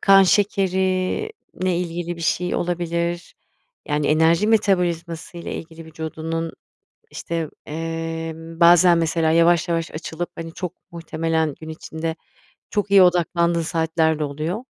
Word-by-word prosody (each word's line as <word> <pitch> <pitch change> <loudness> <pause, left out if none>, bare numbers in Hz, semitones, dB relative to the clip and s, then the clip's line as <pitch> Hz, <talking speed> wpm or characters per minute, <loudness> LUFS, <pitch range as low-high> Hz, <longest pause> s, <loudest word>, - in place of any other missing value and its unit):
kan 195 -1 +7
şekerinle 190 - 0
ilgili 175 0 -3
bir - - -10
şey 180 +2 0
olabilir. 170 0 -2 0.5
Yani, 150 0 0
enerji 160 +5 +3
metabolizması 175 -6 0
ile 170 - -6
ilgili 165 0 -8
vücudunun, 160 +1 -4 0.6
işte, 165 -2 -4 0.2
eee, 165 +1 -4
bazen 170 +1 +5
mesela 165 -1 +1
yavaş 170 +1 +4
yavaş 165 -1 -1
açılıp, 165 +2 -5
hani, 165 0 -6
çok 180 -3 -4 0.2
muhtemelen 160 -2 -1
gün 160 - -8
içinde 160 +1 -5 0.5
çok 205 -2 -1
iyi 200 -1 +8
odaklandığın 170 -1 +3
saatlerde 160 -2 0
oluyor. 155 - -3
165 Hz, 120 wpm, -22 LUFS, 160-180 Hz, 0.6 s, iyi